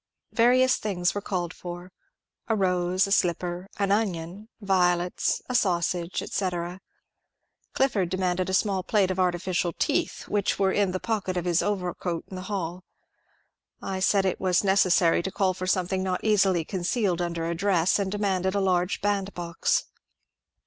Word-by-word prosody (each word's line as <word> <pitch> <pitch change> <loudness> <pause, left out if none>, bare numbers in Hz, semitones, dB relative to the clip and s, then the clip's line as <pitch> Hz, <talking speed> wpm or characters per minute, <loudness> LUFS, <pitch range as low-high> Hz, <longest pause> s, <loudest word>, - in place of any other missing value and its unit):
Various 255 +2 +4
things 180 -4 -1
were 205 - -3
•called 180 -3 -3
for: 175 +1 -8 0.6
a 225 - +1
rose, 180 -1 +1
a 195 - -6
slipper, 180 -1 0
an 200 -1 0
onion, 200 0 -2
violets, 180 -3 +1
a 250 - -4
sausage, 175 -5 0
etc 180 -1 -3 0.9
Clifford 215 -10 +1
demanded 185 0 -1
a - - -2
small 195 -1 +1
plate 195 0 +1
of 185 - -3
artificial 175 -1 0
teeth, - - -1
which 205 -2 0
were 195 -1 +2
in 200 -2 +1
the 185 - -2
pocket 200 -5 -2
of 175 - -2
his 175 -1 +2
overcoat 180 -4 -2
in 190 - -8
the 185 0 -7
haU. 180 -3 -3 1.0
I 190 -1 -4
said 195 +1 +3
it 190 - -1
was 185 0 +2
neces 190 -2 +4
sary 170 -2 +3
to 190 - -4
call 190 -1 +1
for 185 0 -5
something 185 0 0
not 185 -1 -2
easily 195 -6 +3
concealed 185 0 -1
under 170 -1 -2
a 170 - -1
dress, 180 0 +2
and 195 -1 -1
demanded 190 -2 0
a - - +2
large 180 -1 +1
bandbox. 195 -4 0
185 Hz, 160 wpm, -26 LUFS, 175-200 Hz, 1.0 s, Various